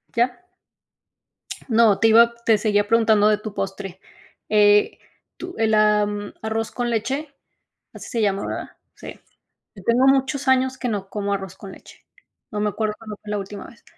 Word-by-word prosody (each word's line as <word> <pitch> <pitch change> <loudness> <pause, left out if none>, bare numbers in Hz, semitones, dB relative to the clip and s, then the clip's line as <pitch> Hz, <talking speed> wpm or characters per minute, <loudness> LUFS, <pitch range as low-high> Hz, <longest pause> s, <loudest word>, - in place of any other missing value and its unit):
¿Ya? 245 +7 0 1.3
No, 225 -3 +4
te 225 - +4
iba 235 +1 +6
te 220 -2 +4
seguía 205 -1 +1
preguntando 220 -2 +4
de 210 -1 +3
tu 210 -1 -8
postre, 195 -1 -5 0.5
eh, 210 -1 +4 0.4
tu 360 0 -8
el, 220 -1 +1
am, 210 -1 +1
arroz 220 0 -3
con 245 -1 -3
leche, 270 +6 -2 0.6
así - - -10
se 230 - -2
llama, 200 -1 0
¿verdad? - - -5 0.3
Sí. - - -11 0.6
Yo 195 - -13
tengo 245 +3 +3
muchos 270 0 +1
años 260 0 +2
que 250 - -3
no 200 -3 -3
como 200 -1 -3
arroz 195 -2 -6
con 195 -2 -10
leche, - - -17 0.4
no 210 -2 -4
me 210 - +1
acuerdo 215 0 -2
cuándo 215 -2 -9
fue 210 - -9
la 210 - -1
última 200 +1 -7
vez. 235 - -18
215 Hz, 170 wpm, -22 LUFS, 205-235 Hz, 1.3 s, iba